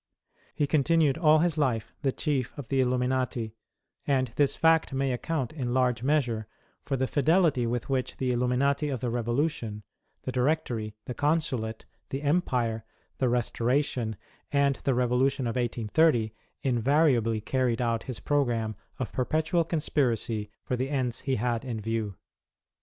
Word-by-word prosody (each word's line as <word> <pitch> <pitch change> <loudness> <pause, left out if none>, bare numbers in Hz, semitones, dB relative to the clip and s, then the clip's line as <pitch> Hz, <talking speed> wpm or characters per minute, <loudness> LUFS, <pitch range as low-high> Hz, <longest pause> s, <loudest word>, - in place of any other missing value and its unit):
He 145 - +2
continued 155 0 +3
all 155 -2 +6
his 160 -1 +1
life 115 -6 0
the 135 -2 +1
Chief 135 -3 -2
of 140 -5 -7
the 135 - +1
Illuminati, 125 -3 0 0.5
and 130 -4 +1
this 145 -2 +2
fact 160 -3 +3
may 135 0 0
account, 130 +1 -2
in 125 -5 -2
large 125 -3 +2
measure, 125 -6 +1 0.3
for 135 - -2
the 130 - +1
fidelity 150 -2 +3
with 120 0 -2
which 130 -2 -1
the 130 -1 0
Illuminati 125 +4 +1
of 130 -3 -2
the 120 0 -2
Revolution, 120 -2 -1 0.4
the 130 - -3
Directory, 125 -5 0
the 125 - -4
Consulate, 135 -7 -1 0.2
the 135 +2 -4
Empire, 125 -8 +1 0.4
the 130 - +2
Restoration, 120 -1 0 0.4
and 140 -1 +2
the 135 - +2
Revolution 125 +2 +2
of 115 - -2
1830, 120 0 +2 0.3
invariably 125 -3 +3
carried 125 +1 0
out 115 -2 0
his 125 -3 -5
programme 120 -7 0 0.2
of 130 - -4
perpetual 160 +6 +1
conspiracy 120 -9 -1
for 125 - -1
the 130 +2 -2
ends 130 -4 -1
he 135 -2 -1
had 120 0 -1
in 120 -4 -4
view. 110 -2 -2
130 Hz, 145 wpm, -28 LUFS, 115-145 Hz, 0.5 s, all